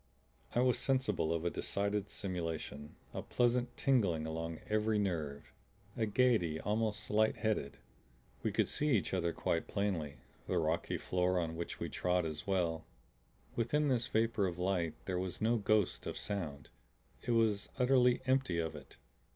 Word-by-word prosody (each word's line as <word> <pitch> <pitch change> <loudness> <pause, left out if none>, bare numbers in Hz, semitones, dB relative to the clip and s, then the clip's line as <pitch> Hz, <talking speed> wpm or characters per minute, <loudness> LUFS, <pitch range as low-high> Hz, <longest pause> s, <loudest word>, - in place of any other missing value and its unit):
I 120 - +4
was 125 -1 +3
sensible 120 - +1
of 85 0 -1
a 85 - +1
decided 100 0 -1
stimulation, 80 -6 -4 0.2
a - - -3
pleasant 120 0 +1
tingling 100 -13 +2
along 80 0 -4
every 110 0 +2
nerve, 80 -8 -2 0.4
a 115 -3 0
gaiety 105 -9 +2
almost 105 +1 -1
light 110 +1 +3
headed. 105 -11 -1 0.6
We - - 0
could - - +2
see 150 -5 +2
each 95 - -3
other 85 -2 +1
quite 85 0 -1
plainly, 95 -8 -1 0.3
the - - 0
rocky - - 0
floor 90 0 +1
on 80 -1 -2
which 85 +1 -5
we - - -2
trod 90 -1 0
as 75 +1 -5
well. 85 -4 +1 0.7
Within 145 +6 +1
this 120 -2 +1
vapor 110 -4 +2
of 85 -1 -4
light 90 -3 0
there 90 -2 -1
was 95 -1 -4
no 115 +2 +3
ghost 105 -2 +1
of - - -4
sound; 80 -10 -4 0.5
it - - -7
was 110 -3 +2
utterly 125 -1 +4
empty 130 -9 +2
of 80 -2 -1
it. - - -12
100 Hz, 160 wpm, -34 LUFS, 85-115 Hz, 0.7 s, I